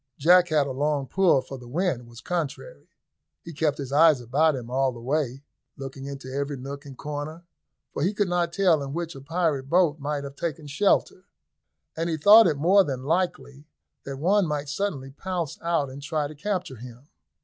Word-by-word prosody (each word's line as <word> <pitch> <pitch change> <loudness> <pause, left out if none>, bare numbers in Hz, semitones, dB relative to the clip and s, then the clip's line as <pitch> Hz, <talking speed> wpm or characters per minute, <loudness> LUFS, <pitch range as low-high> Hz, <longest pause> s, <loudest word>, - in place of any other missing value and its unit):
Jack 175 +4 +5
had 150 -3 +2
a 135 - -4
long 145 +1 0
pull, 170 0 +3
for 135 - -9
the 125 - -12
wind 135 -4 -1
was 120 0 -13
contrary. 175 - -5 0.5
He 170 - -9
kept 150 -1 0
his 135 -2 -6
eyes 155 -1 +5
about 140 +6 +2
him 125 -3 -6
all 135 0 +1
the 120 - -10
way, 135 +1 -2 0.3
looking 135 0 -7
into 135 -2 -7
every 140 0 -2
nook 140 +3 -8
and 135 -2 -11
corner, 150 +3 -6 0.5
for - - -3
he 180 +6 +2
could 205 -1 0
not 175 -1 0
tell 175 -5 +3
in 140 0 -5
which 170 0 -4
a 135 - -10
pirate 150 -3 -1
boat 170 -3 +3
might 145 0 -3
have 140 0 -8
taken 155 -1 -4
shelter, 185 +4 +1 0.7
and 165 +1 -2
he 160 - -1
thought 205 +7 +8
it 155 -4 0
more 185 +7 +5
than 130 -5 -4
likely 150 -3 -2 0.4
that 140 -1 -6
one 185 +5 +2
might 150 -1 -3
suddenly 145 -5 -3
pounce 170 0 -4
out 165 -4 0
and 140 +2 -9
try 150 0 -2
to 150 - -10
capture 180 - -3
him. 125 +3 -12
150 Hz, 195 wpm, -25 LUFS, 135-170 Hz, 0.7 s, thought